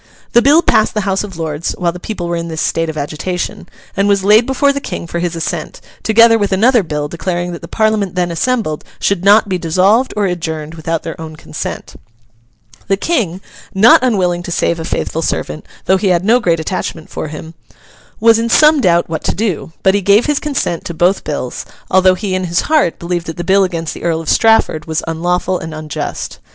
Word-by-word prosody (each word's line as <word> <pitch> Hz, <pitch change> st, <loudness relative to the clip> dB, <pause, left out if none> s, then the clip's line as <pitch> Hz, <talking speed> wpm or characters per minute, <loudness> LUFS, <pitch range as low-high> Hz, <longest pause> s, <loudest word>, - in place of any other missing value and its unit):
The 240 Hz, -, +5 dB
bill 295 Hz, +6 st, +5 dB
passed 215 Hz, -, +2 dB
the 210 Hz, -, +1 dB
House 195 Hz, 0 st, -1 dB
of 195 Hz, -5 st, -8 dB
Lords 160 Hz, 0 st, -3 dB
while 175 Hz, -2 st, 0 dB
the 180 Hz, -, -9 dB
people 180 Hz, -2 st, -5 dB
were 170 Hz, -, -1 dB
in 170 Hz, 0 st, -3 dB
this 160 Hz, -1 st, -5 dB
state 165 Hz, +1 st, 0 dB
of 155 Hz, -, -5 dB
agitation, 170 Hz, +5 st, -4 dB, 0.3 s
and 195 Hz, +1 st, +1 dB
was 200 Hz, -1 st, +2 dB
laid 215 Hz, +4 st, +5 dB
before 280 Hz, +1 st, +2 dB
the 280 Hz, -, -3 dB
King -, -, -5 dB
for 170 Hz, 0 st, -4 dB
his 175 Hz, -1 st, -2 dB
assent, 165 Hz, -, -4 dB, 0.2 s
together 225 Hz, +1 st, +5 dB
with 205 Hz, -1 st, 0 dB
another 230 Hz, +5 st, +4 dB
bill 150 Hz, -4 st, -3 dB
declaring 175 Hz, +2 st, -3 dB
that 170 Hz, -, -7 dB
the -, -, -9 dB
Parliament 215 Hz, -4 st, 0 dB
then 175 Hz, -1 st, 0 dB
assembled 170 Hz, -3 st, -1 dB, 0.2 s
should 195 Hz, -3 st, 0 dB
not 205 Hz, +2 st, +5 dB
be 185 Hz, -2 st, -2 dB
dissolved 190 Hz, +10 st, +2 dB
or 205 Hz, -, +2 dB
adjourned 160 Hz, -4 st, -4 dB
without 165 Hz, 0 st, -3 dB
their 165 Hz, 0 st, -7 dB
own 160 Hz, -1 st, -8 dB
consent. 160 Hz, -, -6 dB, 0.9 s
The 195 Hz, -, +1 dB
King—not 200 Hz, -, +2 dB
unwilling 185 Hz, -8 st, +1 dB
to 175 Hz, -, -7 dB
save 170 Hz, 0 st, 0 dB
a 160 Hz, -, -4 dB
faithful 165 Hz, -, -2 dB
servant, 155 Hz, -1 st, -3 dB, 0.2 s
though 190 Hz, -, +3 dB
he 195 Hz, -, -1 dB
had 180 Hz, 0 st, +2 dB
no 235 Hz, +4 st, +4 dB
great 170 Hz, -8 st, +1 dB
attachment 160 Hz, -1 st, -4 dB
for -, -, -4 dB
him—was 155 Hz, -, -2 dB
in 230 Hz, 0 st, -1 dB
some 300 Hz, +3 st, +5 dB
doubt 175 Hz, -5 st, +3 dB
what 160 Hz, -1 st, -4 dB
to -, -, 0 dB
do; 190 Hz, -6 st, -2 dB
but 190 Hz, -, +4 dB
he 200 Hz, -, +1 dB
gave 200 Hz, +4 st, +4 dB
his 295 Hz, -2 st, +1 dB
consent 275 Hz, -, -2 dB
to 170 Hz, -, -5 dB
both 180 Hz, +4 st, +2 dB
bills, 145 Hz, -4 st, -4 dB, 0.3 s
although 185 Hz, 0 st, +5 dB
he 190 Hz, 0 st, -3 dB
in 185 Hz, 0 st, -1 dB
his 175 Hz, 0 st, 0 dB
heart 300 Hz, -, +1 dB
believed 175 Hz, 0 st, -3 dB
that 165 Hz, +1 st, -6 dB
the 175 Hz, -, -3 dB
bill 195 Hz, +2 st, +3 dB
against 165 Hz, -4 st, -3 dB
the -, -, -10 dB
Earl 165 Hz, -1 st, 0 dB
of 165 Hz, -, -5 dB
Strafford 225 Hz, -8 st, +3 dB
was 160 Hz, -1 st, -2 dB
unlawful 175 Hz, +3 st, -1 dB
and 160 Hz, -1 st, -7 dB
unjust. 155 Hz, -1 st, -5 dB
180 Hz, 210 wpm, -15 LUFS, 165-210 Hz, 0.9 s, The